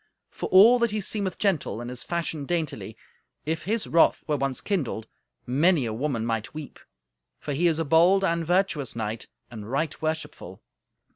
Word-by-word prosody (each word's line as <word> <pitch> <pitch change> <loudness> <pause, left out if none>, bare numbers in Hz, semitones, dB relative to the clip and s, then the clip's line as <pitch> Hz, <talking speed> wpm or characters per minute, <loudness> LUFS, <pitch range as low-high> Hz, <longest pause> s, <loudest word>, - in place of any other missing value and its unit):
For - - -5
all 225 +7 +7
that 235 -1 +2
he 215 0 -2
seemeth 200 -1 -1
gentle, 170 - 0
and 120 +1 -6
is 125 -1 -5
fashioned 160 0 -3
daintily, 165 -4 -3 0.5
if 155 0 -2
his 220 +3 0
wrath 165 - +3
were 150 - 0
once 135 -2 -1
kindled, 140 - -2 0.4
many 145 +3 +2
a 110 - -3
woman 120 -1 -2
might 115 +3 -3
weep, 155 -2 -8 0.6
for 145 - -4
he 170 +6 +2
is 160 -2 +1
a 165 - -1
bold 175 +6 +4
and 170 -2 +1
virtuous 170 -6 0
knight, 110 -1 -4 0.2
and 110 -2 -8
right 150 +4 -2
worshipful." 155 - -4
155 Hz, 170 wpm, -26 LUFS, 125-175 Hz, 0.6 s, all